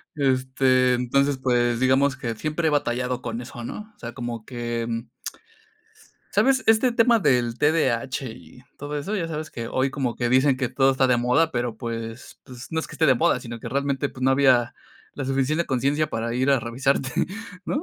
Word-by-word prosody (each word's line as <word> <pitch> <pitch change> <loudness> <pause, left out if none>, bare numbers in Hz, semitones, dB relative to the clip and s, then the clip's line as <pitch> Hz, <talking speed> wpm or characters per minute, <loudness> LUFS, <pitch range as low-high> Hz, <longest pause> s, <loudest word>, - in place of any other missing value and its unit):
este, 130 -2 +2
entonces, 135 +3 +1
pues, 120 -2 +1
digamos 135 +2 +3
que 115 -2 -4
siempre 155 +7 -2
he - - +4
batallado 125 -2 -1
con 115 0 -4
eso, 120 -1 -9
¿no?, 210 - -7
o - - -37
sea, 120 0 -7
como 120 -3 -6
que, 120 -2 -3
mm 115 0 -4 1.2
¿Sabes?, 265 -1 +3
este 225 +3 +4
tema 235 0 +4
del 125 - +1
T-D-A-H 135 -4 +1
y 120 +2 -14 0.2
todo 145 +1 -4
eso, 200 +9 -3
ya 170 -4 -2
sabes 155 0 -5
que 115 -1 -6
hoy 130 +1 0
como 130 -4 -2
que 120 -1 -1
dicen 130 +2 +4
que 130 -2 -1
todo 135 +1 +3
está 130 0 +2
de 125 -1 +3
moda, 125 +7 +2
pero 120 -5 -2
pues 115 0 -6
pues, 125 -1 -10
no 160 - -2
es - - -6
que - - -11
esté 160 - +2
de 135 - +5
moda, 125 +1 +2
sino 120 -1 -7
que - - -6
realmente, 140 0 -1
pues, 130 - -10
no 130 - +4
había 130 -3 +3 0.4
la 140 - -4
suficiente 135 +5 0
conciencia 140 +4 0
para 115 -3 -3
ir 130 +3 +1
a 135 -3 +3
revisarte, 130 +3 0 0.5
¿no? 290 - -2
130 Hz, 200 wpm, -24 LUFS, 120-145 Hz, 1.2 s, de